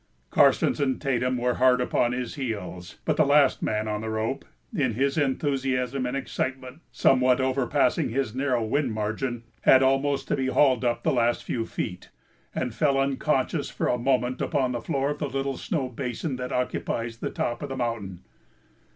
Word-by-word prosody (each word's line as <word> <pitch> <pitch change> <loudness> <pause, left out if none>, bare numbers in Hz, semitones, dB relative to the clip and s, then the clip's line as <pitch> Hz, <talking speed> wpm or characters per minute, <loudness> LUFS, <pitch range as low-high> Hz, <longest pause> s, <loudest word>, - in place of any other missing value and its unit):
Karstens - - +4
and 135 -2 0
Tatum 125 -2 0
were 125 0 +1
hard 130 -1 +5
upon 125 -1 +1
his 125 -1 -3
heels, 100 - -5
but 155 - +1
the 155 - +6
last 140 -1 +4
man 110 0 -1
on 105 0 -2
the 110 - -4
rope, 110 0 -2 0.3
in 130 -6 +1
his 140 +3 +1
enthusiasm 135 -3 0
and 130 +2 -2
excitement 130 +1 -4
somewhat 130 -1 +3
overpassing 130 0 +1
his 125 -2 -1
narrow 130 -2 0
wind 130 +2 0
margin, 110 +3 -3 0.2
had 130 0 +6
almost 135 +1 +1
to - - +2
be 135 -2 -1
hauled 130 -2 +3
up 120 -1 0
the - - +2
last 120 -1 +1
few 115 -2 -3
feet, 90 0 -5 0.5
and 125 -3 -2
fell 140 +1 +2
unconscious 140 +2 0
for - - -2
a 125 - +1
moment 125 0 0
upon 135 -5 0
the 120 -1 -3
floor 135 +4 -1
of 145 - -5
the 145 - -2
little 135 0 -2
snow 150 -9 -2
basin 125 +3 -4
that 125 0 -5
occupies 115 -2 -2
the - - -3
top 120 - -3
of 145 - -5
the 135 - -4
mountain. 110 -7 -3
130 Hz, 180 wpm, -26 LUFS, 120-135 Hz, 0.5 s, the